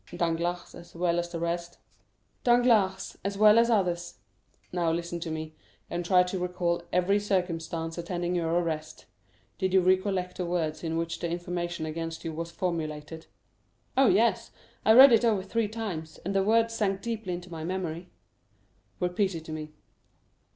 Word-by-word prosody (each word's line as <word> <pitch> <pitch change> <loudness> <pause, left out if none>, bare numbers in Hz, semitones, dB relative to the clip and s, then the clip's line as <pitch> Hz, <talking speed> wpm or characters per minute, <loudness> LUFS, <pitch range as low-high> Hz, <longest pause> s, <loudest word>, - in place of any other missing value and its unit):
"Danglars, 170 +1 -1
as 170 0 -13
well 170 0 +1
as 175 0 -3
the 170 -1 -5
rest?" 170 +1 -3 0.7
"Danglars, 225 -6 +3
as 200 0 -3
well 215 +2 +7
as 235 0 +3
others." 180 -6 0 0.6
"Now, 175 -2 +1
listen 170 +1 -3
to 170 -1 -5
me, 155 0 -5 0.4
and 175 +1 -2
try 180 +1 +5
to 180 +1 -3
recall 180 -1 -1
every 180 +3 +2
circumstance 170 -4 -2
attending 175 0 -2
your 170 -2 0
arrest. 165 -2 -2 0.5
Do 190 - +2
you 190 0 +4
recollect 185 0 +1
the 180 - -2
words 160 -3 -2
in 165 0 -2
which 165 0 -3
the 170 - -2
information 175 -1 -3
against 165 +1 -5
you 165 - -3
was 165 +1 -4
formulated?" 160 -2 -4 0.7
"Oh 270 0 +5
yes, 230 +3 +3 0.3
I 220 - +6
read 265 +3 +10
it 230 - +5
over 215 -5 +2
three 220 +3 -1
times, 200 -8 -5
and 195 - -1
the 195 - +3
words 225 +3 +3
sank 195 -3 -1
deeply 220 -5 -3
into 175 0 -7
my 160 -1 -6
memory." 175 -1 -4 0.9
"Repeat 180 +1 0
it 160 -1 -7
to 160 - -8
me." 155 -1 -6
175 Hz, 165 wpm, -28 LUFS, 165-195 Hz, 0.9 s, read